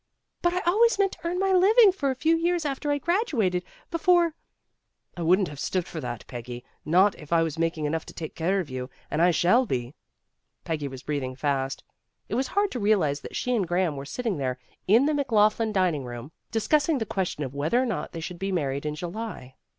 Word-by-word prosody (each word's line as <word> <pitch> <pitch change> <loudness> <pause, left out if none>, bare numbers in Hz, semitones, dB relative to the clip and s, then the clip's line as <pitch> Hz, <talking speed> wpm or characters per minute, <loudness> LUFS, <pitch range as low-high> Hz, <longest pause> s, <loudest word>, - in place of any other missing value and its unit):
"But 345 0 +1
I 365 - 0
always 430 +7 +3
meant 395 -1 +2
to - - -11
earn 350 +1 -1
my 385 +1 +1
living 405 +4 +6
for 300 -7 -1
a 260 - -1
few 320 +5 +2
years 340 0 0
after 285 +1 -2
I 290 - +2
graduated, 275 - 0 0.3
before 340 0 +3 0.4
" - - -47
"I 175 - -6
wouldn't 180 +3 +3
have 145 -1 -9
stood 185 +2 -1
for 160 - -6
that, 120 -4 -5
Peggy, 120 0 -8 0.2
not 185 +6 +4
if 150 0 -12
I 165 -1 +4
was 160 0 -3
making 165 -2 0
enough 160 +2 -2
to - - -10
take 160 -2 -6
care 185 +4 0
of 180 - -3
you, 130 -1 -5 0.2
and 155 - 0
I 175 - +6
shall 205 +9 +3
be." 125 -3 -2 0.7
Peggy 150 -3 -2
was 130 -1 -9
breathing 135 -4 -3
fast. 135 -1 -1 0.5
It - - -4
was 260 +3 +1
hard 405 +4 +1
to 250 - -3
realize 190 -9 +2
that - - -9
she 250 0 0
and 200 -6 0
Graham 175 -2 +1
were 135 0 -6
sitting 225 - -2
there 130 -2 -2 0.3
in 225 +8 +5
the 305 - +2
McLaughlin 225 -5 +2
dining 180 -8 +1
room, 120 +3 -8 0.2
discussing 295 +7 +2
the 225 - -2
question 185 -7 -2
of 130 -1 -5
whether 150 +12 +1
or 260 - +2
not 235 - -3
they 165 - -6
should 175 +1 -6
be 195 +1 -2
married 140 -4 -1
in 150 - -3
July. 175 - -6
185 Hz, 220 wpm, -26 LUFS, -, 0.7 s, living